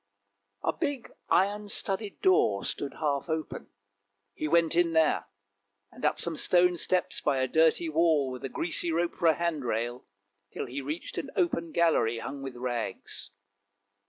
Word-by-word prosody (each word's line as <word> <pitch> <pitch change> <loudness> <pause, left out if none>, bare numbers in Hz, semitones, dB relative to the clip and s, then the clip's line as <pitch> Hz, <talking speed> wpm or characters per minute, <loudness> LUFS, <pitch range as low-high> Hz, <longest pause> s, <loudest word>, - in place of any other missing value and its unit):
A - - +1
big 285 -7 -3 0.2
iron 205 +2 +2
studded 200 0 -1
door 105 - +3
stood 140 - -4
half 145 0 -1
open; 160 0 -3 0.7
he 155 - -3
went 165 +1 +3
in 170 -1 +2
here, 160 -1 +3 0.7
and - - -14
up 150 - +1
some 170 -1 -1
stone 180 +2 +3
steps 180 +2 0
by 135 - +1
a 130 0 +1
dirty 160 +3 +3
wall 155 -4 +2
with 125 - -7
a 135 - -3
greasy 170 +4 -1
rope 170 +1 0
for 170 - 0
a 160 - +5
hand 170 -4 -1
rail, 120 +1 -3 0.4
till - - -4
he 130 +3 -5
reached 150 +5 -4
an - - -5
open 170 - 0
gallery 155 -10 +2
hung 135 +4 -6
with 135 -2 -6
rags. 120 -2 -4
160 Hz, 160 wpm, -29 LUFS, 135-175 Hz, 0.7 s, a